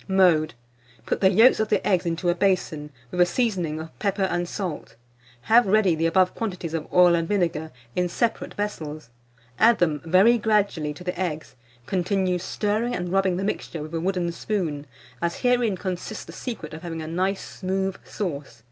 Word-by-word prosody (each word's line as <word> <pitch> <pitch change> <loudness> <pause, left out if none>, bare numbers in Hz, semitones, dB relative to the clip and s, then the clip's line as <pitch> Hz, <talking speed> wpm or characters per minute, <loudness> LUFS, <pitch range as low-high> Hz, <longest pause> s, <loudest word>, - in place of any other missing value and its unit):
Mode. 175 -6 +3 0.5
Put - - -2
the 190 - +6
yolks 225 +7 +6
of 220 -1 0
the 205 - +1
eggs 180 -3 +2
into 170 +2 -1
a - - +4
basin, 175 -5 0 0.2
with 180 - 0
a - - +7
seasoning 180 -9 -1
of 160 0 -10
pepper 200 -1 0
and 175 -2 -1
salt; 175 - -5 0.5
have 230 - +4
ready 200 -3 +4
the 165 +1 +1
above 185 +2 +3
quantities 180 -7 -4
of 165 -1 -4
oil 180 -1 +6
and 165 -1 +1
vinegar, 165 -5 0 0.3
in 180 0 +1
separate 230 +6 -1
vessels; 155 - -5 0.5
add 230 +1 +6
them 155 -4 +1
very 190 +8 +5
gradually 205 -8 +1
to 180 - -10
the 180 0 -4
eggs; 155 -7 -3 0.3
continue 185 +1 0
stirring 215 +6 -1
and 175 0 -3
rubbing 190 -2 +2
the 190 - -2
mixture 170 -5 -3
with 155 +2 -9
a 165 - -1
wooden 180 -1 0
spoon, 170 -6 -3 0.3
as 170 0 -2
herein 245 -5 +2
consists 185 +3 -5
the - - -10
secret 220 - -6
of 160 - -8
having 165 -2 -5
a - - -6
nice 185 +4 -1
smooth 190 0 -1
sauce. 145 - -5
180 Hz, 185 wpm, -24 LUFS, 165-200 Hz, 0.5 s, a